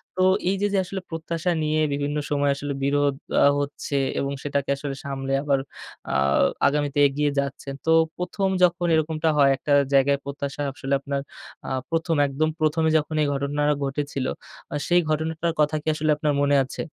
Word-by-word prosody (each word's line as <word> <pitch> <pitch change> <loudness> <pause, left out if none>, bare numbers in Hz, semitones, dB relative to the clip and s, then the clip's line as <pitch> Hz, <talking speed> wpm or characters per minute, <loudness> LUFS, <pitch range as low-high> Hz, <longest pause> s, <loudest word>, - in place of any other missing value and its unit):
তো 185 - -1 0.3
এই 195 - +1
যে, 205 - +3
যে 195 - +2
আসলে 190 +1 -5
প্রত্যাশা 165 +2 -2
নিয়ে 155 0 +1
বিভিন্ন 145 +1 -2
সময় 145 -1 +2
আসলে 145 0 -4
বিরোধ 140 0 +2 0.3
আ - - +7
হচ্ছে 145 0 -4 0.2
এবং 140 0 -1
সেটাকে 140 -1 -2
আসলে 140 -1 -5
সামলে 135 -1 -4
আবার, 140 -2 +2 0.5
আ - - -1 0.5
আগামীতে 145 0 0
এগিয়ে 145 +1 0
যাচ্ছেন। 140 0 -4
তো 160 - +3 0.3
১ম 180 +2 -1 0.2
যখন 175 0 +3
এরকমটা 160 0 0
হয়, 140 -1 +6
একটা 145 - -1 0.2
জায়গায় 140 +1 +4
প্রত্যাশা 140 0 -5
আসলে 135 0 -3
আপনার 140 0 -3 0.5
আ - - -3 0.2
১ম 165 0 0
একদম 155 +3 0
প্রথমে 160 +1 +2
যখন 155 0 -2
এই 145 - +2
ঘটনা 140 +1 -2 0.2
ঘটেছিল? 140 -1 -3 0.5
আ - - -1
সেই 175 0 +4
ঘটনাটার 160 +2 -1
কথা 150 +1 +2
কি 160 - -16
আসলে 155 0 +1
আপনার 150 -1 0
মনে 145 0 +3
আছে? - - -6
145 Hz, 175 wpm, -24 LUFS, 140-160 Hz, 0.5 s, আ